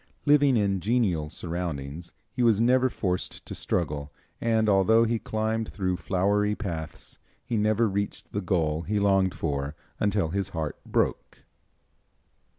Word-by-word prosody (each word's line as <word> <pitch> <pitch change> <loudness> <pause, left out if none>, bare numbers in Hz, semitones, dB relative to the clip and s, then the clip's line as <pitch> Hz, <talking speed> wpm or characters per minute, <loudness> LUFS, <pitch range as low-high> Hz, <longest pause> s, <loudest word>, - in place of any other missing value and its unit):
Living 145 -3 +5
in 100 -2 +1
genial 95 -7 +1
surroundings, 85 -2 -4 0.2
he 125 - -2
was 115 -4 +4
never 130 +2 +4
forced 90 -6 -3
to - - -7
struggle, 75 -4 -2 0.3
and 110 -1 +2
although 105 +3 +5
he 115 0 0
climbed 110 +1 -2
through 95 -2 -1
flowery 100 +3 +1
paths, 80 -7 -6 0.3
he 120 - -2
never 110 +1 +2
reached 100 0 -3
the 100 - -1
goal 80 -5 0
he 105 +4 -1
longed 95 -2 +3
for 70 -1 -2 0.2
until 100 -5 +1
his 100 +2 -2
heart 80 -5 -4
broke. - - -1
100 Hz, 140 wpm, -27 LUFS, 85-110 Hz, 0.3 s, Living